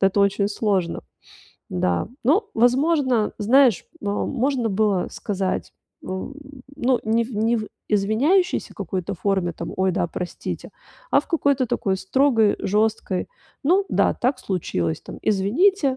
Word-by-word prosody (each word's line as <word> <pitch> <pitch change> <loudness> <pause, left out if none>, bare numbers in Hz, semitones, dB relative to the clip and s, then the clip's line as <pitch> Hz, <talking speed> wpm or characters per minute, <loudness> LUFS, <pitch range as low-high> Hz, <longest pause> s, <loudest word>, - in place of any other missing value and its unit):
это 195 +1 +3
очень 200 0 +2
сложно. 200 -5 -1 0.7
Да, 90 -1 0 0.2
но, 330 - +3
возможно, 255 -1 +2
знаешь, 240 -1 +4 0.2
но 205 -5 -1
можно 260 -2 0
было 200 -2 +1
сказать 195 -2 -3 0.3
в, 190 +9 -5 0.4
ну, 255 -2 +2
не 225 +1 +2
в 240 - -9
не 225 +2 +2
в 215 - -5 0.2
извиняющейся 245 - +1
какой-то 190 0 -4
форме, 190 -2 0
там: 170 +1 -6
"Ой, 190 0 +2
да 175 - 0
простите", 175 +2 -5 0.4
а - - +6
в - - -19
какой-то 280 -6 +2
такой 200 -4 0
строгой, 225 +1 +2
жёсткой: 210 -2 0 0.4
"Ну 370 +7 +4
да, - - +2
так 255 +2 0
случилось, 90 - -2
там, - - -9
извините, 265 - +2
215 Hz, 135 wpm, -23 LUFS, 190-265 Hz, 0.7 s, а